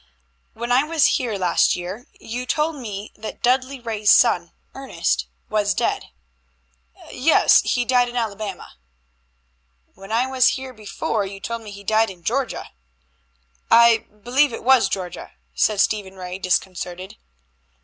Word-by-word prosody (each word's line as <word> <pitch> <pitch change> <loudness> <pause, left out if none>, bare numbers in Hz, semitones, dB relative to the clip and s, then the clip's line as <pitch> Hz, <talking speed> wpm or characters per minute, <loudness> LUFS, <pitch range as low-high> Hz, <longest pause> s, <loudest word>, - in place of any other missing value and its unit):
"When 235 +1 -4
I 255 +3 +4
was 315 -1 +2
here 235 -5 +1
last 180 -2 +2
year 190 - -7
you 245 +3 -6
told 305 +4 0
me 210 -6 -7
that 220 - -8
Dudley 260 +2 +1
Ray's 220 -3 -1
son, 175 -8 +4 0.2
Ernest, 270 0 -2 0.2
was 210 -1 0
dead." - - -1 1.1
"Yes, 305 +6 +4
he 245 -1 0
died 245 -1 +3
in 240 - -10
Alabama." 210 - -4 1.2
"When 195 +2 -12
I 235 +3 +2
was 260 0 +2
here 260 -1 -8
before 215 -1 -3
you 195 0 -9
told 230 +3 -5
me 215 - -10
he 200 0 -10
died 220 +2 +2
in 180 -3 -12
Georgia." 250 +6 -2 1.0
"I 230 -1 +5 0.2
believe 265 +3 +3
it - - -7
was 260 0 +4
Georgia," 185 -2 -5 0.2
said 215 -2 +1
Stephen 200 -2 0
Ray, 180 0 -7
disconcerted. 185 0 -3
225 Hz, 140 wpm, -22 LUFS, 195-250 Hz, 1.2 s, I